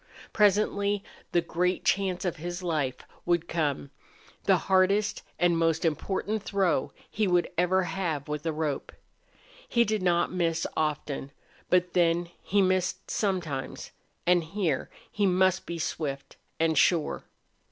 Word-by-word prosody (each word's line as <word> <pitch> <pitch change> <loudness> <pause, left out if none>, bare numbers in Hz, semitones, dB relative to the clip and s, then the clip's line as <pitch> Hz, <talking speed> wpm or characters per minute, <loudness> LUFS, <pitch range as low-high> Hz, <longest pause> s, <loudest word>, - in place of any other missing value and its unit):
Presently 205 -1 +2 0.3
the 175 - +3
great 180 +2 -1
chance 190 -2 +1
of 175 -1 -1
his 175 +3 -5
life 150 -7 -1 0.3
would 170 -1 +1
come 145 - -1 0.5
the - - +5
hardest 200 +3 +2 0.2
and 175 -1 +3
most 165 0 +1
important 195 +7 -1
throw 195 -3 0 0.2
he 215 -2 0
would 175 -1 +3
ever 180 +2 +2
have 165 -4 -2
with 150 0 -3
a - - +2
rope. 150 -2 -3 0.8
He 235 - +4
did 215 -2 -1
not 175 -1 +2
miss 165 -2 0
often, 145 -2 -2 0.4
but 180 -1 +2
then 170 0 +2
he 200 0 +2
missed 185 -1 0
sometimes, 175 -10 -2 0.3
and 175 -1 +4
here 180 0 -1 0.2
he 205 -1 +1
must 185 0 +2
be 170 - -4
swift 145 -3 -4 0.2
and 160 -1 +2
sure. 165 -4 +2
175 Hz, 135 wpm, -28 LUFS, 160-190 Hz, 0.8 s, the